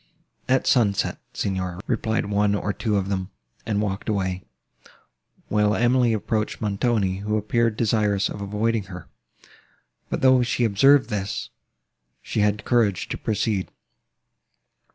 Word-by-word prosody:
"At 130 0 +2
sunset, 105 -6 +2
Signor," 95 -2 -3
replied 110 -2 -1
one 100 0 +1
or 100 0 -2
two 110 -3 -1
of 95 -1 0
them, 95 -1 -2 0.4
and 105 -1 0
walked 100 +1 -3
away; 95 -3 -1 1.1
while 105 0 +2
Emily 120 0 +3
approached 110 0 -2
Montoni, 100 -2 0
who 105 +2 -1
appeared 115 +1 0
desirous 105 -3 +1
of 100 - -7
avoiding 105 +1 -1
her: 90 -3 -10 1.0
but, - - -3
though 130 -1 +5
she 125 0 0
observed 130 +5 +4
this, 105 +1 -3 0.7
she - - -3
had 105 0 +1
courage 110 -7 +1
to - - -3
proceed. 105 -2 -1
105 Hz, 130 wpm, -24 LUFS, 100-115 Hz, 1.1 s, though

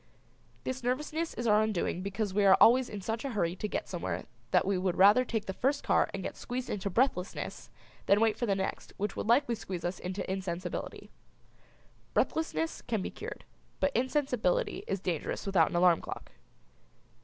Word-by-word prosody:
This 260 0 -3
nervousness 300 +6 -2
is 240 - -3
our 210 -1 +5
undoing 210 -4 -1
because 200 +1 -2
we 205 +1 +2
are 190 -1 +7
always 250 +2 +6
in 205 -2 -6
such 225 +3 -3
a 275 -3 -3
hurry 175 -4 0
to 210 - -2
get - - -3
somewhere 175 -2 -3 0.3
that - - +3
we 195 +1 +1
would 185 -1 0
rather 205 +6 +7
take 225 -4 -2
the 190 - -3
first 275 +7 0
car - - +3
and - - -5
get - - -4
squeezed 250 +1 -4
into 200 -1 -2
breathlessness 210 -3 -1 0.4
than 200 - +5
wait 225 -1 +3
for 240 - -2
the 200 - +2
next 190 0 -4
which 205 0 -2
would - - -3
likely 240 +2 +4
squeeze 190 -6 -5
us 175 +1 -2
into 185 +2 -4
insensibility. 185 -2 -4 1.0
Breathlessness 325 0 0
can 220 -5 -2
be - - -4
cured, 450 +3 -8 0.3
but 285 -1 +1
insensibility 255 - 0
is 195 - -1
dangerous 175 -5 -3
without 190 -5 +3
an - - -5
alarm 175 -1 +5
clock. - - -7
210 Hz, 185 wpm, -31 LUFS, 190-250 Hz, 1.0 s, are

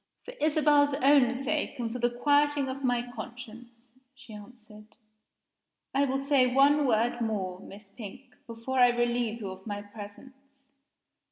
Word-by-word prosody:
"For - - -9
Isabel's 295 -2 +3
own 275 -3 +5
sake, 285 +2 -2
and 230 -2 -4
for 250 - -5
the 240 0 +2
quieting 290 +3 +1
of 270 +1 -6
my 245 -1 0
conscience," 240 0 -11 0.2
she 265 -4 -14
answered, 215 0 -14 1.0
"I 275 +1 +2
will 270 0 -1
say 275 -2 +2
one 280 +2 +4
word 235 +1 +1
more, 195 -5 -3
Miss 200 +1 -13
Pink, 235 +5 -11
before 230 +3 -4
I 245 -1 +7
relieve 240 -1 -1
you 195 -2 -5
of 190 +2 -12
my 205 -1 -5
presence. 265 +6 -14
245 Hz, 150 wpm, -28 LUFS, 220-275 Hz, 1.0 s, I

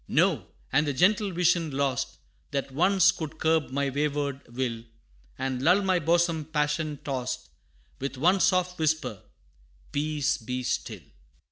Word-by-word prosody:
No, - - +2 0.3
and 150 +3 +3
the 145 - 0
gentle 200 +7 +3
vision, 170 -2 +2
lost, 135 -2 -1 0.3
That 140 -1 -3
once 190 +6 +4
could 160 -4 -6
curb 160 -1 +2
my 140 +1 -1
wayward 140 -1 -1
will, 120 -2 -2 0.5
And 130 -1 -2
lull 180 +8 +4
my 185 -2 +2
bosom 165 -1 +2
passion 150 0 -1
tossed, 125 - -4 0.5
With 135 0 -4
one 180 +8 +3
soft 185 -1 +2
whisper, 155 - 0 0.7
"Peace, 150 0 0
be 125 +2 -4
still!" - - -3
150 Hz, 135 wpm, -27 LUFS, 135-170 Hz, 0.7 s, once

